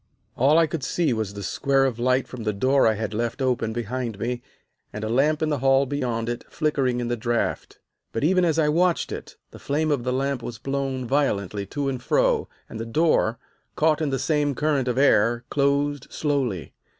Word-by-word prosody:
"All 140 +5 +4
I 165 - +5
could 155 -2 -4
see 155 -1 +1
was 110 -3 -3
the 100 - -6
square 135 +6 +1
of 125 -3 -2
light 130 +2 +2
from 125 - -8
the 105 -1 -1
door 130 +5 +3
I 110 - +3
had 110 0 -4
left 115 +3 -2
open 125 -4 0
behind 120 -1 -3
me, 120 +3 -3 0.5
and 105 - -6
a 110 - -2
lamp 150 +6 +2
in 155 - +1
the 145 -3 0
hall 135 +1 +4
beyond 125 -5 -2
it 120 0 -3
flickering 135 -6 0
in 120 - -2
the 120 - 0
draught. 120 0 -2 0.3
But 115 - -3
even 180 +4 +3
as 165 -2 +2
I 155 -2 +3
watched 170 +3 +1
it, - - -7 0.2
the - - -12
flame 155 +2 0
of 140 -5 0
the 125 - -1
lamp 135 0 -1
was 120 -1 -6
blown 135 +1 -3
violently 105 -7 0
to 145 +6 -3
and 130 -2 -2
fro, - - +1 0.2
and 110 - -8
the 115 - -4
door, 120 -4 +2 0.4
caught 155 0 +2
in 155 - 0
the 135 - 0
same 145 -1 0
current 145 -3 0
of 125 0 -1
air, 120 -3 +3
closed 140 0 +1
slowly. 130 - -2
130 Hz, 210 wpm, -24 LUFS, 115-145 Hz, 0.5 s, I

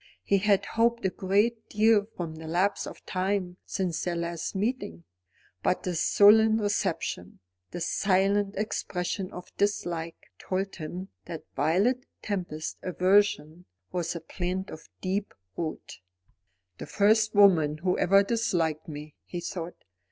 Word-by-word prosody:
He 200 - +2
had 200 0 +3
hoped 235 -1 +1
a 190 - +2
great 210 +5 0
deal 215 -1 +4
from 170 -3 -4
the 160 0 -8
lapse 185 +5 0
of - - -11
time 185 -1 -1
since 185 -5 -2
their 175 -2 -1
last 170 0 -3
meeting. 195 - -2 0.6
But 180 - 0
this 175 -3 -1
sullen 220 +2 +6
reception, 190 - -2 0.3
this 175 -1 -3
silent 195 +1 +2
expression 185 -2 -2
of 180 0 -10
dislike, 170 - -2
told 195 +1 -3
him 180 +4 -6 0.2
that 165 -2 -7
Violet 195 - +1 0.2
Tempest's 175 -6 -3
aversion 180 -3 +2 0.3
was 175 -1 -2
a 170 - -5
plant 185 +1 -4
of 160 - -11
deep 195 +2 -2 0.2
root. 160 -9 -5 0.8
"The - - -6
first 215 +1 +3
woman 165 -7 +5
who 180 +3 0
ever 195 +2 +5
disliked 175 -8 0
me," 150 -1 -8
he 175 - -4
thought. 175 0 -6
185 Hz, 135 wpm, -28 LUFS, 170-205 Hz, 0.8 s, sullen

